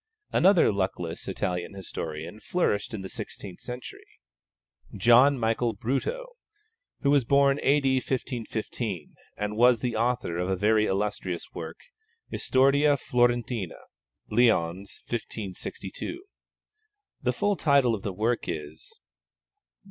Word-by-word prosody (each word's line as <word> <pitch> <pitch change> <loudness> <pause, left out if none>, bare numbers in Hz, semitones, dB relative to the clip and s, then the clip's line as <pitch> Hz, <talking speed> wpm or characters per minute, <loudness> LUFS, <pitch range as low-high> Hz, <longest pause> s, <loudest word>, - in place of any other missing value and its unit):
Another 185 - +5
luckless 95 -4 -3
Italian 90 +2 -3
historian 85 -1 -6
flourished 105 - 0
in 105 -4 -5
the - - -5
sixteenth 95 0 -8
century, 125 0 -8 0.9
John 125 +4 +6
Michael 115 0 0
Bruto, 135 - -2 0.8
who 140 - +3
was 145 -2 +4
born 140 +2 +4
A.D. 135 -1 +3
1515, 115 - -3 0.2
and 105 0 -2
was 120 0 +5
the 125 -2 -1
author 115 -6 0
of 90 +1 -1
a 95 - +2
very 105 +3 +3
illustrious 95 -3 -2
work, - - -6 0.5
Historia 140 +2 +3
Florentina 120 -5 0 0.5
(Lyons, 100 -5 +1
1562). 110 - -5 1.0
The - - +1
full 205 0 +1
title 140 -7 +3
of 105 - -3
the 100 - -3
work 110 +5 0
is: 80 -2 -6
_Joh. - - -38
115 Hz, 115 wpm, -27 LUFS, 95-130 Hz, 1.0 s, John